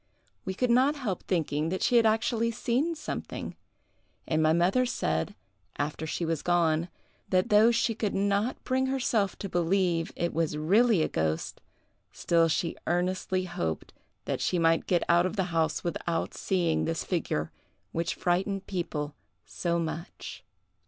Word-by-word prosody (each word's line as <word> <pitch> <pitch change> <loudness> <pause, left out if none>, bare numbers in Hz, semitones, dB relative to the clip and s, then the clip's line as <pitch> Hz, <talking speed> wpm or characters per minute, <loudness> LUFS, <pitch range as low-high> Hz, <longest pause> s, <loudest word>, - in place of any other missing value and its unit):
We 190 - -3
could 250 +3 +1
not 260 +5 +4
help 225 - -3
thinking 155 -3 0
that 185 +2 -2
she 245 - +4
had 230 -1 +5
actually 225 +1 +1
seen 245 +8 0
something; 310 -1 -5 0.7
and 155 0 +1
my 155 0 +4
mother 175 +9 +3
said, 80 - -1 0.4
after 150 +2 -3
she 170 - -2
was 165 -2 -1
gone, 170 -1 +2 0.4
that 185 -1 +2
though 215 +2 +6
she 235 0 +2
could 215 -2 -2
not 200 +4 0
bring 260 0 +1
herself 240 -7 0
to 200 - -5
believe 175 -1 +1
it 170 0 -1
was 160 -2 0
really 195 +4 +4
a - - +1
ghost, 80 0 -2 0.5
still 165 -1 +2
she 165 +1 -1
earnestly 185 +2 0
hoped 80 - -4 0.3
that - - -2
she 180 - +1
might 165 -1 +2
get 175 -2 +2
out 175 +1 +4
of 185 - -5
the 195 - +1
house 160 -2 +1
without 170 -1 -2
seeing 175 -4 0
this 165 0 -2
figure, 80 - -2 0.4
which 170 +1 -2
frightened 190 +2 0
people 165 -6 -3 0.3
so 170 -1 -1
much. 165 +2 -5
175 Hz, 155 wpm, -28 LUFS, 165-215 Hz, 0.7 s, though